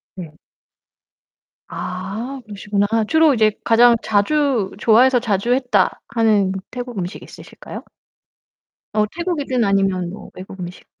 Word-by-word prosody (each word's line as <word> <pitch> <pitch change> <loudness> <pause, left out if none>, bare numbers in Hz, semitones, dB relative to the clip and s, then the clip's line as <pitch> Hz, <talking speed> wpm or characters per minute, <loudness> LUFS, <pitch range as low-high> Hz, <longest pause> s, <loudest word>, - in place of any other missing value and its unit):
네. 170 -5 -8 1.4
아 220 +9 -6
그러시구나. 205 0 -2 0.2
주로 315 -2 +4
이제 215 -3 +3
가장 235 +1 +5
자주 230 0 +1
'좋아해서 245 +4 +4
자주 230 +1 0
했다.' 245 -7 +1
하는 215 -5 +2 0.2
태국 245 -2 -6
음식 180 +3 -5
있으실까요? - - -11 1.1
어 215 0 +2
태국이든 295 -9 -1
아니면 195 -3 +1
뭐 210 +3 -10
외국 190 +1 -10
음식. 175 0 -8
215 Hz, 255 characters per minute, -20 LUFS, 195-250 Hz, 1.4 s, 가장